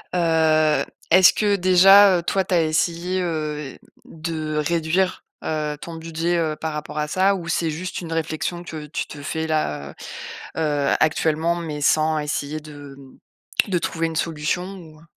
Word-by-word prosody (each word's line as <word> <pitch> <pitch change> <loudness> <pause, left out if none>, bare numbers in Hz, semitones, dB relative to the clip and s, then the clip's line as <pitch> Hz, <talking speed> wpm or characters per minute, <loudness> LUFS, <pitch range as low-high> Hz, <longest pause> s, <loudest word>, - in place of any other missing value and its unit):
Heu, 160 -2 +3 0.3
est-ce 185 0 +7
que 205 -1 +2
déjà, 190 +1 +7
heu, - - -6
toi, 190 +2 +1
tu 190 - -3
as 165 - +4
essayé, 170 +3 0
heu, 150 -4 -3 0.3
de 155 -1 -4
réduire, 170 +4 0 0.2
heu, 150 -1 -2
ton 170 -1 -7
budget, 165 +1 -2
heu, 155 -2 0
par 160 -1 -4
rapport 150 0 -5
à 150 - -1
ça? 190 +4 +2
Ou 170 -2 -6
c'est 165 -1 0
juste 180 +4 -5
une 165 -1 -5
réflexion 165 +2 -3
que 155 -3 -7
tu 150 - -4
te 145 - -9
fais 160 +2 -3
là, 75 - -1 0.7
heu - - 0
heu, 145 -2 +1
actuellement, 160 +2 +1
mais 155 -4 -5
sans 155 +1 +3
essayer 150 0 -3
de 145 -2 -11 0.7
de 180 -2 +1
trouver 165 0 -1
une 160 - -6
solution? 165 +2 -1
Ou, 155 -3 -14
heu - - -19
160 Hz, 170 wpm, -22 LUFS, 155-175 Hz, 0.7 s, est-ce